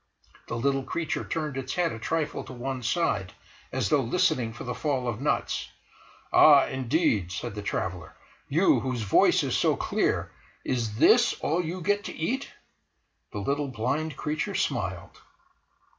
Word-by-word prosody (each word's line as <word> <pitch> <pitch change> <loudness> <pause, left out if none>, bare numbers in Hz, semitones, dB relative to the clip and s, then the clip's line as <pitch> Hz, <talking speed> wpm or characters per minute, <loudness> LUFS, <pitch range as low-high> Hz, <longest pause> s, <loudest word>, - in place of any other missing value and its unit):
The 120 - -3
little 135 +3 +1
creature 160 +4 -3
turned 150 -4 -3
its 130 -1 -4
head 175 -2 +1
a 110 - -6
trifle 155 +5 -2
to - - -9
one 130 +1 -4
side 120 - 0 0.4
as 100 - -1
though 145 - +3
listening 135 -3 +1
for 115 - -9
the 125 - -3
fall 135 -4 -1
of 120 0 -3
nuts. 145 - -1 0.6
"Ah, 145 -3 +8
indeed!" 130 - 0
said 90 - -4
the 105 - -5
traveller: 90 -3 -4 0.3
"You, 170 +7 +4
whose 130 -3 -2
voice 100 - +4
is - - -1
so - - +3
clear, - - 0 0.3
is 115 -5 -1
this - - +5
all 170 +4 0
you 175 +3 -4
get 205 +3 +1
to - - -5
eat?" 260 +12 -2 0.8
The - - -6
little 140 +7 -1
blind 140 +5 -2
creature 155 +1 -2
smiled - - -2
135 Hz, 160 wpm, -27 LUFS, 115-160 Hz, 0.8 s, Ah